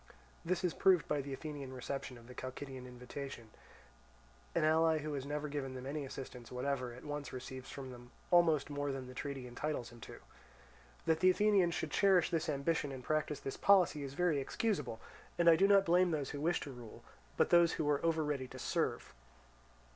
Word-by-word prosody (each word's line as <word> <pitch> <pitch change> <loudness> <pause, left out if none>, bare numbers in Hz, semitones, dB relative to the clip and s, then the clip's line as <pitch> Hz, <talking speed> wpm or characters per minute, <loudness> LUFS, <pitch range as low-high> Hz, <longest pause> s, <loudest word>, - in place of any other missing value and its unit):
This 180 +2 -1
is 180 - +1
proved 185 -4 +4
by 145 -1 0
the 140 +1 -7
Athenian 140 -1 -6
reception 130 0 -5
of 115 - -15
the 125 - -11
Chalcidian 130 0 -7
invitation: 125 -1 -8 1.0
an - - +2
ally 160 +1 +4
who 155 0 -4
has 140 -1 -4
never 150 +1 -2
given 140 -3 -4
them 130 0 -7
any 145 +1 -3
assistance 130 -3 -8
whatever, 125 0 -2
at 125 +4 -11
once 145 -1 -4
receives 130 0 -7
from 135 -2 -7
them 120 0 -12 0.2
almost 165 -5 +4
more 145 0 -1
than 135 -1 -5
the 130 - -10
treaty 135 -1 -5
entitles 125 -1 -3
him 120 -1 -14
to. - - -9 0.9
That 160 -1 +2
the 185 +2 +6
Athenians 190 -3 +3
should 155 - -3
cherish 190 -3 +4
this 165 -2 0
ambition 145 +1 0
and 130 -2 -7
practise 155 -1 -1
this 135 - -5
policy 185 -6 +4
is 140 0 -6
very 170 -3 +2
excusable; 150 - -1 0.4
and 170 - +2
I 165 - +9
do 195 +4 +4
not 200 -1 +6
blame 180 +2 +4
those 150 -5 -2
who 145 - -5
wish 170 +2 +2
to 145 - -6
rule, 120 -4 -11 0.3
but - - +3
those 170 -1 +6
who 155 - -1
are 145 -1 +1
over 165 -1 +2
ready 140 -3 -2
to - - -10
serve. - - -1
145 Hz, 200 wpm, -35 LUFS, 130-165 Hz, 1.0 s, I